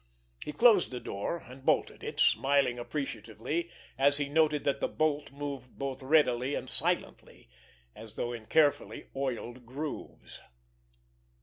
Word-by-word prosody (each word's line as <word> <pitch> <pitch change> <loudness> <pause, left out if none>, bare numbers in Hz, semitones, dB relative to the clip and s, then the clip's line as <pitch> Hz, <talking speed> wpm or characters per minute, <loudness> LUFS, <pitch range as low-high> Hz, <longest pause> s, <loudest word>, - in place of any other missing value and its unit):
He - - -5
closed 215 +3 +5
the 125 - -5
door, 115 +8 -4
and 130 +2 -13
bolted - - 0
it, - - -6
smiling 135 -3 +3
appreciatively 130 +4 -4 0.3
as 140 +1 +9
he 145 -1 -2
noted 150 -1 +2
that 140 -1 0
the - - 0
bolt 150 -3 -1
moved 140 -3 -7
both 135 -1 -4
readily 130 -2 +2
and - - -5
silently, - - -2 0.5
as 110 0 -11
though 120 0 -3
in 110 -2 -9
carefully 145 +3 +1
oiled 130 -2 -4
grooves. 145 +4 -7
140 Hz, 135 wpm, -30 LUFS, 125-150 Hz, 0.5 s, as